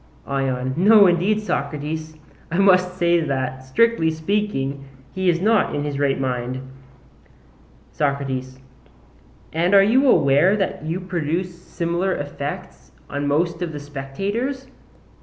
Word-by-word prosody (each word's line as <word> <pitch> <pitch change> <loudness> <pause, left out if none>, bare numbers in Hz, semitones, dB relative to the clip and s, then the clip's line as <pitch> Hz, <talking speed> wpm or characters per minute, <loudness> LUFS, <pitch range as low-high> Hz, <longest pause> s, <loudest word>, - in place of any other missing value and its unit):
ION: 130 -2 -2
No 205 +3 +7
indeed, 185 +4 +2
Socrates, 155 -1 -4 0.3
I 170 - -1
must 185 -2 +3
say 170 -1 +3
that, 130 -4 -3
strictly 165 - +2
speaking, 160 -5 -2 0.3
he 190 -1 0
is 170 -1 +2
not 215 -3 +2
in 145 - -2
his 145 -1 -3
right 140 -2 +1
mind. 125 -1 -2 1.3
SOCRATES: 135 -3 -2 1.0
And 175 +5 +2
are 195 - +8
you 255 +7 +3
aware 145 - +4
that 195 -6 -2
you 165 +4 -3
produce 175 0 -2
similar 175 +2 -2
effects 145 0 -6 0.2
on 145 +1 -2
most 165 +4 0
of 170 -3 -3
the 145 - -5
spectators? 195 - -4
160 Hz, 125 wpm, -21 LUFS, 140-190 Hz, 1.3 s, are